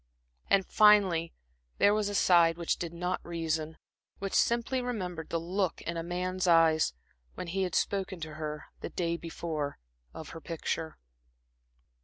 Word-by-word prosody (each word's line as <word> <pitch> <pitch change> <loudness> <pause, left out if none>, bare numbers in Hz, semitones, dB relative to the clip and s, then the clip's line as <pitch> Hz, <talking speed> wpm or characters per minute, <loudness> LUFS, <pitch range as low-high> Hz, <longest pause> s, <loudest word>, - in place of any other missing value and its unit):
And 195 -1 +4
finally 195 -6 +5 0.5
there 205 - +5
was 210 -1 +1
a 205 - -3
side 170 -3 +5
which 170 -1 0
did 170 -2 -4
not 180 +2 -3
reason, 160 -2 -2 0.4
which 195 0 -4
simply 240 +2 +2
remembered 185 -10 -4
the 165 - 0
look 185 +2 -1
in 170 - -3
a 165 - -2
man's 180 +2 -2
eyes, 160 - +4 0.4
when - - -5
he 185 +3 -2
had 185 -1 -1
spoken 195 -2 -1
to 160 -1 -6
her 150 -1 -5
the - - -5
day 170 -2 -1
before 165 -3 -4 0.3
of 160 - -9
her 165 - -9
picture. 160 -1 -4
170 Hz, 155 wpm, -30 LUFS, 165-190 Hz, 0.5 s, finally